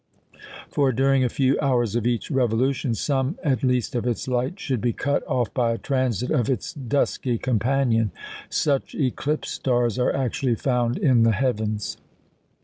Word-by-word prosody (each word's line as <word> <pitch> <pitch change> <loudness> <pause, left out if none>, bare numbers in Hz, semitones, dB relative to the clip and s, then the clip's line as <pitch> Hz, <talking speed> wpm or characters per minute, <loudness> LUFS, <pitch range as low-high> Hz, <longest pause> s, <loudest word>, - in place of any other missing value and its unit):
For, 140 -2 +1
during 135 +2 +2
a 125 - +2
few 135 +2 +1
hours 120 -6 +1
of 120 0 0
each 120 +5 -1
revolution, 130 0 +1
some 135 - -1
at 135 -4 +1
least 125 -1 0
of 120 -1 -1
its 120 +1 -2
light 130 +9 -1
should 130 -6 -2
be 120 -1 +1
cut 140 +5 -1
off 125 -6 -1
by 120 -2 +1
a - - -3
transit 130 -4 -1
of 120 -1 +1
its 130 - -2
dusky 130 -2 -1
companion. 120 -1 +1 0.4
Such 140 -3 0
"eclipse 145 +2 -1
stars" 120 -2 0
are 125 - +2
actually 130 -1 0
found 125 0 0
in 130 -5 +3
the 115 0 +4
heavens. 110 -3 -1
125 Hz, 160 wpm, -24 LUFS, 120-135 Hz, 0.4 s, the